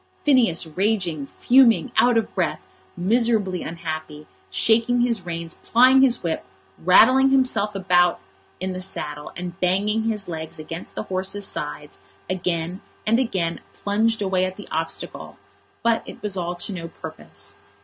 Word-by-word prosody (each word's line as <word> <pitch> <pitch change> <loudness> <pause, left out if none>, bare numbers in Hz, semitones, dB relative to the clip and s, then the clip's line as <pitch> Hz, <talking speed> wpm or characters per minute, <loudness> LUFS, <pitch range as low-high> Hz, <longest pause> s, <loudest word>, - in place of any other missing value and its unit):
Phineas 240 - +3
raging, 175 -4 -1
fuming, 250 - +4
out 245 -1 +5
of 225 - -1
breath, - - -1 0.3
miserably 205 -1 +1
unhappy, 155 -2 -6 0.2
shaking 230 - +3
his 230 -7 0
reins, 165 -1 -4
plying 255 +3 +4
his 250 -3 +3
whip, 165 -2 -2 0.4
rattling 255 +9 +6
himself 240 -6 +1
about 180 -2 +3 0.4
in 185 0 -3
the 185 - -5
saddle, 150 -5 -4
and 180 +1 -6
banging 205 +5 +1
his 215 -3 -1
legs 160 -2 -6
against 165 +2 -8
the - - -3
horse's 190 +2 -2
sides, 150 -2 -6 0.3
again 180 0 -2 0.2
and 230 +3 +3
again 185 -9 -1
plunged 220 +2 0
away 190 -1 +1
at 185 0 -2
the 205 - -10
obstacle. 160 +1 -4 0.5
But 230 -1 +2
it - - -9
was 205 -2 -3
all 175 -1 -3
to 175 +3 -4
no 170 -2 -6
purpose. 165 - -9
190 Hz, 145 wpm, -23 LUFS, 170-225 Hz, 0.5 s, rattling